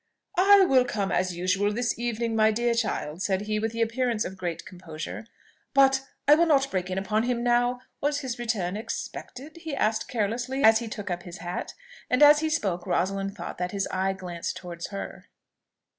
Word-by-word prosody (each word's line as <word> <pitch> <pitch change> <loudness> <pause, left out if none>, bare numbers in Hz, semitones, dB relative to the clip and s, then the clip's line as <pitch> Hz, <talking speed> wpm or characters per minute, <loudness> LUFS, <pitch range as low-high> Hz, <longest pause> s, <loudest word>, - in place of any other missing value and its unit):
"I 400 +1 +7
will 260 -4 +5
come, 205 -5 -2
as 185 -1 0
usual, 190 +3 +1
this 235 +2 -1
evening, 235 -1 -1
my 220 0 +5
dear 235 +2 +1
child," 195 -8 -2
said 190 +1 0
he, 215 0 -1
with 225 +1 -1
the 230 0 0
appearance 230 -1 0
of 190 - -6
great 175 -3 -4
composure; 175 +3 -8 0.5
"but 270 -1 +5 0.3
I 290 - +9
will 335 +3 +4
not 275 -3 +3
break 185 -1 -2
in 185 - -3
upon 210 +3 0
him 240 0 -1
now. 245 +1 +2 0.2
Was 290 0 0
his 255 -3 -4
return 205 -6 -1
expected?" 260 +6 -6
he 320 -3 -5
added 220 -3 0
carelessly, 245 +4 -2
as 220 0 +7
he 235 - -5
took 205 -3 -5
up 175 0 -2
his 175 0 -9
hat; 175 -1 -5 0.3
and 250 +3 +4
as 295 0 +8
he 315 0 0
spoke 195 - -1
Rosalind 195 +2 -1
thought 175 - -7
that 180 +1 -2
his 195 -1 -1
eye 190 +1 0
glanced 180 -3 -5
towards 170 -2 -7
her. 200 -1 -7
220 Hz, 195 wpm, -26 LUFS, 190-250 Hz, 0.5 s, I